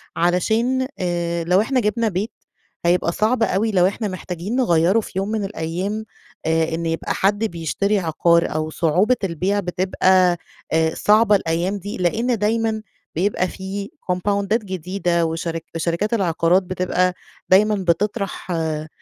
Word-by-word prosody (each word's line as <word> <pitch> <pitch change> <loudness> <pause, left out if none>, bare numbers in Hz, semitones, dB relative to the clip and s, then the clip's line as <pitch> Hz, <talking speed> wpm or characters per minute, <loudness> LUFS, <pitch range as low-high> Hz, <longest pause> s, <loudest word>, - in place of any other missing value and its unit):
علشان 225 +9 +1
آآ، 170 -1 -1
لو 180 +4 +3
إحنا 260 +3 +1
جبنا 225 0 +1
بيت، 205 +4 -2 0.5
هيبقى 170 0 +2
صعب 225 +5 +1
أوي 220 +1 +1
لو 185 -2 +4
إحنا 210 +2 -2
محتاجين 185 +2 -5
نغيّره 185 -4 +3
في - - -7
يوم 195 - -1
من 220 -2 -1
الأيّام 195 +4 -3 0.4
آآ 160 0 +1
إنّ 165 0 -3
يبقى 165 0 -1
حد 205 +3 +1
بيشتري 200 +3 -1
عقار 170 0 +2
أو 155 0 -2
صعوبة 180 +10 +2
البيع 190 +3 0
بتبقى 185 -1 +2 0.4
آآ 160 0 +2
صعبة 210 0 +4
الأيّام 175 +2 0
دي 200 +2 -6
لأن 225 +7 +1
دايمًا 220 +1 0 0.3
بيبقى 185 +2 +1
في 195 +2 -6
كومباوندات 200 +4 0
جديدة 180 -2 -1
وشرك 165 0 -3
وشركات 170 +6 -1
العقارات 180 -2 +2
بتبقى 185 0 0 0.4
دايمًا 210 +3 +5
بتطرح 195 +1 -1
آآ، 155 -2 -2
185 Hz, 140 wpm, -21 LUFS, 170-210 Hz, 0.5 s, دايمًا